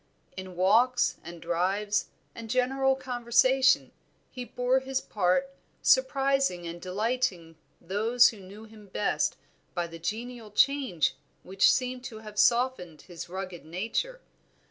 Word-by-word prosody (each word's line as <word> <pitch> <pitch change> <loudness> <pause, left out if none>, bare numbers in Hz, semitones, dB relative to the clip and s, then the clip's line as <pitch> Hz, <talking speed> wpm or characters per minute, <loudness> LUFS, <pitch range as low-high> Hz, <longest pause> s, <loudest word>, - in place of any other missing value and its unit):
In 185 -1 -8
walks 230 +7 +3
and 170 +1 -9
drives, 190 +5 0 0.3
and 230 -1 -9
general 265 +2 +2
conversation, 255 +1 +2 0.4
he 250 - -6
bore 250 +1 0
his 265 0 -2
part, 215 +8 0 0.3
surprising 275 - +2
and 170 +1 -7
delighting 185 -4 -2 0.2
those 225 +7 +3
who 220 - -10
knew 195 +3 -12
him 215 -2 -15
best 200 +2 -1 0.4
by 175 -1 -1
the 165 0 -10
genial 225 +5 -5
change 230 - +2 0.3
which 190 +1 +4
seemed 255 -1 -2
to 230 -4 -7
have 215 -1 -8
softened 235 -10 +1
his 175 -1 -9
rugged 185 -1 -6
nature. 225 - -3
220 Hz, 125 wpm, -28 LUFS, 185-255 Hz, 0.4 s, which